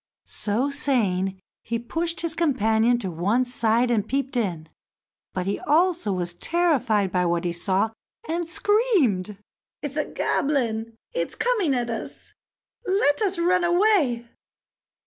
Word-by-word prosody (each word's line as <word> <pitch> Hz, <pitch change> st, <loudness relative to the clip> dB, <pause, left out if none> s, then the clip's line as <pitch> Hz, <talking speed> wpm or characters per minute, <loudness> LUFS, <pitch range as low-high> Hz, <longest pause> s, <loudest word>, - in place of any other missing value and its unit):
So 235 Hz, +7 st, -1 dB
saying, 195 Hz, -10 st, 0 dB, 0.2 s
he 235 Hz, -, -2 dB
pushed 330 Hz, +8 st, -2 dB
his 335 Hz, -1 st, -2 dB
companion 240 Hz, -7 st, +2 dB
to 195 Hz, -6 st, -4 dB
one 200 Hz, +10 st, +1 dB
side 240 Hz, 0 st, +1 dB
and 215 Hz, -4 st, +1 dB
peeped 275 Hz, 0 st, -2 dB
in, 175 Hz, -9 st, -1 dB, 0.6 s
but 185 Hz, -1 st, -3 dB
he 200 Hz, -, -1 dB
also 340 Hz, -, +2 dB
was 175 Hz, -2 st, -2 dB
terrified 235 Hz, -, +1 dB
by 180 Hz, 0 st, +1 dB
what 170 Hz, 0 st, 0 dB
he 175 Hz, -, 0 dB
saw, 190 Hz, +5 st, 0 dB, 0.4 s
and 335 Hz, 0 st, -2 dB
screamed: 340 Hz, -, +1 dB, 0.5 s
"It's 290 Hz, 0 st, -4 dB
a 300 Hz, -, +1 dB
goblin! 230 Hz, -6 st, -1 dB, 0.2 s
It's -, -, -2 dB
coming 415 Hz, -, +1 dB
at 240 Hz, -1 st, -1 dB
us; 225 Hz, -, -7 dB, 0.5 s
let 375 Hz, -4 st, +2 dB
us 390 Hz, -3 st, +1 dB
run 355 Hz, +1 st, +2 dB
away!" 345 Hz, -, +2 dB
245 Hz, 135 wpm, -24 LUFS, 205-335 Hz, 0.6 s, companion